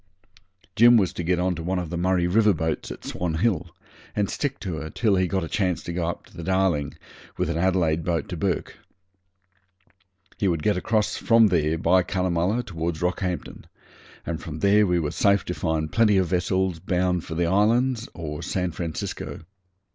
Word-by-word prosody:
Jim 120 +1 +7
was 95 -5 +1
to - - -4
get 90 +1 +1
on 90 +1 +1
to 85 - -6
one 90 +3 -1
of 90 -3 -4
the - - -3
Murray 90 0 +1
River 105 +2 +3
boats 80 -1 -2
at - - -9
Swan 85 -3 -3
Hill, 90 -2 0 0.5
and 100 -2 0
stick 140 -2 -2
to 90 -6 -4
her 80 0 -5
till 105 +1 +1
he 95 -1 +2
got 95 +1 -1
a - - -4
chance 90 -3 -1
to 85 - -5
go 85 -1 -1
up 85 - -5
the - - -11
Darling 85 -5 0 0.4
with 85 - 0
an 80 - -2
Adelaide 85 -3 +1
boat 85 -1 -1
to 90 - -4
Bourke. 90 +2 -2 1.6
He 100 - +1
could 85 -4 0
get 105 - +2
across 105 +3 0
from 115 -2 +5
there 80 -3 +1
by 95 +2 +3
Cunnamulla 90 +5 0
towards 85 -3 -4
Rockhampton, 90 0 -3 0.6
and 80 -1 -4
from 80 -2 -7
there 100 +1 +4
we 90 -1 +2
were 75 -3 -2
safe 100 -1 +2
to 90 - -3
find 80 -3 -2
plenty 110 -3 +4
of 95 - +3
vessels 95 -1 0
bound 90 -1 0
for 80 - -6
the 85 +1 +1
islands 115 +6 +2
or 75 -3 -5
San 90 -2 -2
Francisco. 80 -1 -5
90 Hz, 190 wpm, -24 LUFS, 85-100 Hz, 1.6 s, Jim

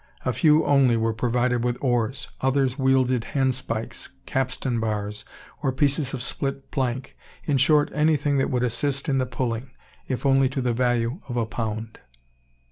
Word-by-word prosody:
A - - +1
few 155 -2 +4
only 135 -4 +4
were 115 0 +1
provided 120 +1 0
with 120 0 0
oars; 125 0 -1
others 135 -1 +2
wielded 130 -3 +2
handspikes, 130 -4 -1 0.2
capstan 125 -2 -1
bars, 105 -1 -3 0.4
or 135 - +1
pieces 140 +1 +1
of 120 - -4
split 135 +1 -3
plank, 130 -1 -2 0.3
in 145 -3 +1
short, 145 +3 +4
anything 150 -2 +2
that - - +1
would 125 -1 0
assist 135 +3 -1
in 135 -2 +2
the 130 - 0
"pulling," 120 0 -3 0.4
if 130 +1 -3
only 135 -1 +4
to 135 +1 -3
the 125 -1 0
value 120 +4 0
of 120 - -3
a 115 - +1
pound. 110 0 -4
130 Hz, 160 wpm, -24 LUFS, 120-135 Hz, 0.4 s, few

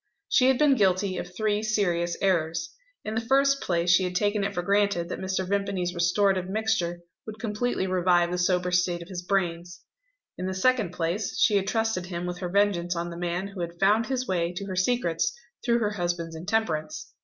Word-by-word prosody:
She 255 - +4
had 265 -1 +4
been 295 -1 +5
guilty 190 -4 +1
of 175 - -6
three 210 0 0
serious 175 -6 0
errors. 175 - 0 0.3
In 215 - -3
the 225 - 0
first 275 +3 +3
place 175 -1 +1
she 180 +1 +5
had 180 0 -3
taken 205 +2 +1
it 200 0 -2
for 175 - -1
granted 200 -3 +1
that - - -4
Mr. 190 0 -2
Vimpany's 195 -3 -1
restorative 185 +2 +1
mixture 195 -5 -1 0.3
would 215 0 -7
completely 220 -1 -1
revive 180 -2 +2
the 180 - -1
sober 180 0 +1
state 180 -1 +1
of 170 - -16
his 180 -2 -5
brains. 175 -2 -2 0.6
In 185 - -2
the 190 - -3
second 220 -2 +2
place, 180 +4 -2
she 215 - +4
had 195 -1 +1
trusted 225 -5 0
him 175 -1 -4
with 180 0 -4
her 180 - -3
vengeance 180 -3 +1
on 170 +1 -3
the - - -7
man 175 +3 -3
who 195 -2 -7
had 170 0 -5
found 210 +4 +3
his 255 -1 -1
way 170 -2 0
to 195 +3 -5
her 190 -1 -5
secrets 185 -4 0 0.3
through 235 -1 +2
her 215 -3 0
husband's 175 -4 -3
intemperance. 220 - -2
185 Hz, 200 wpm, -26 LUFS, 175-210 Hz, 0.6 s, been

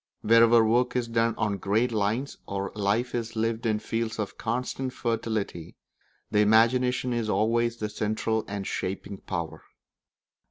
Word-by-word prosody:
Wherever 115 0 +6
work 120 +3 +2
is 125 -2 0
done 115 0 +1
on 105 -2 0
great 110 +6 +1
lines 110 +6 -1
or 100 0 -3
life 105 +4 0
is 115 -1 -3
lived 115 +1 -1
in 110 -1 +2
fields 115 +1 -3
of 105 -2 -4
constant 125 +2 -3
fertility, 110 -8 -3 0.6
the 105 - +3
imagination 120 +4 +3
is 115 -2 -1
always 115 +3 +1
the 105 - -2
central 110 +1 -1
and 100 -1 -4
shaping 95 +1 -4
power. 85 -5 -5
110 Hz, 145 wpm, -27 LUFS, 105-115 Hz, 0.6 s, Wherever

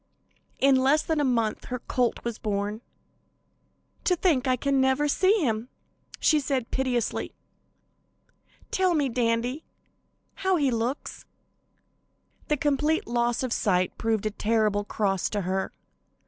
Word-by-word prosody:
In 275 -1 +5
less 275 +4 +3
than 320 -2 0
a - - +2
month 230 -5 0
her 250 - -3
colt 245 -1 -1
was 235 -1 -4
born. 205 +1 -2 1.2
"To 360 - +3
think 315 -7 +1
I 255 - +3
can 275 +1 +1
never 265 +3 +2
see 375 +6 +3
him," 225 +1 -1 0.5
she 310 - +4
said 270 -4 -2
piteously. 255 -3 -1 1.4
"Tell 370 -2 +2
me, 285 -3 +1
Dandy, 240 +4 0 0.8
how 380 -1 +2
he 285 -6 +2
looks!" 235 +4 -3 1.2
The 300 - +1
complete 295 +2 +1
loss 240 +1 0
of 250 -3 -1
sight 185 -3 +1
proved 220 -2 0
a 215 - 0
terrible 215 -1 +1
cross 195 -3 0
to 205 - -2
her. 190 +1 -2
250 Hz, 135 wpm, -26 LUFS, 220-280 Hz, 1.4 s, In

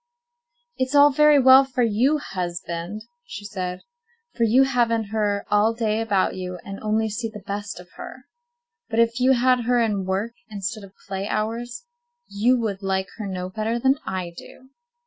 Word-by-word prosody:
"It 260 - +3
is 260 +3 -5
all 290 0 +7
very 300 +1 +5
well 265 0 +8
for 255 -2 -1
you, 235 +7 +2
husband," 175 - -5 0.2
she 205 0 -8
said, 185 -3 -4 0.5
"for 235 - +2
you 245 +5 +5
haven't 230 -5 +1
her 205 -2 0
all 210 +2 +3
day 220 -1 0
about 205 -4 +1
you, 180 -1 -5
and 195 0 -7
only 220 +1 0
see 225 +2 -3
the 210 -3 -11
best 200 -1 -5
of 180 - -12
her. 255 - -9 0.7
But - - -3
if 230 +1 +2
you 260 +1 +5
had 250 -1 +2
her 245 0 +3
in 210 -5 0
work 195 +5 -2 0.2
instead 205 +1 -5
of 195 -1 -13
play 195 0 -3
hours, 230 - -3 0.4
you 240 +5 +2
would 210 -4 -3
like 190 -1 -1
her 215 -3 -5
no 185 -1 -5
better 220 +3 -2
than 265 +3 +2
I 185 -2 -4
do. 260 +8 -14
215 Hz, 180 wpm, -23 LUFS, 195-245 Hz, 0.7 s, well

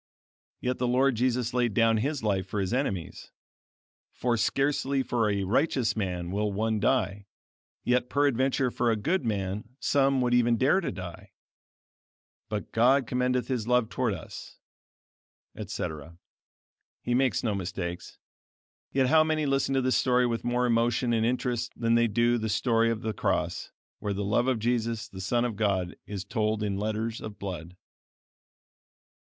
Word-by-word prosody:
Yet 125 0 -1
the 125 - +1
Lord 130 +2 +3
Jesus 125 0 0
laid 120 -4 +1
down 115 -1 +4
his 140 +3 -2
life 95 -3 0
for 105 - -3
his 95 +3 -1
enemies; 100 - -3 0.8
for 120 -1 0
"scarcely 135 +3 +1
for 115 -3 0
a 100 -1 0
righteous 125 - +1
man 90 -4 -3
will 105 +1 0
one 110 +2 0
die; 100 -3 0 0.6
yet 125 0 +1
peradventure 135 -2 +1
for 120 - 0
a 115 - +3
good 155 - 0
man 105 +1 -3
some 135 -1 +2
would 125 -1 +1
even 120 -1 +3
dare 140 +10 +3
to 170 - -2
die; 95 +2 -9 1.2
but 105 -2 -4
God 130 +4 +4
commendeth 125 0 0
His 120 -4 -2
love 125 -2 +2
toward 120 -6 -1
us," - - -10 1.0
etc. 80 +2 -6 0.9
He 120 - -1
makes 130 0 +2
no 110 -4 0
mistakes. 90 -2 -5 0.7
Yet 135 -1 +2
how 155 +4 +5
many 155 -1 0
listen 135 -1 +1
to 135 - +3
this 130 0 +2
story 125 -1 +3
with 115 -1 -1
more 120 +1 +1
emotion 120 +1 +1
and 110 -1 +2
interest 125 0 -1
than 115 0 +2
they 115 0 +4
do 120 +2 +2
to 120 - +2
the 110 0 -2
story 115 +2 +2
of 115 -1 -2
the 110 -1 -2
cross, - - -1 0.3
where 105 - -2
the 100 +1 -3
love 110 +5 +1
of 130 -2 +2
Jesus, 115 -1 -1
the 95 -4 -9
Son 120 +5 +1
of 115 -3 -2
God, 95 -4 0
is 100 -1 -5
told 110 +1 -1
in 100 -2 -1
letters 110 +3 -2
of 105 -2 -7
blood! 90 -3 -6
115 Hz, 165 wpm, -28 LUFS, 105-125 Hz, 1.2 s, how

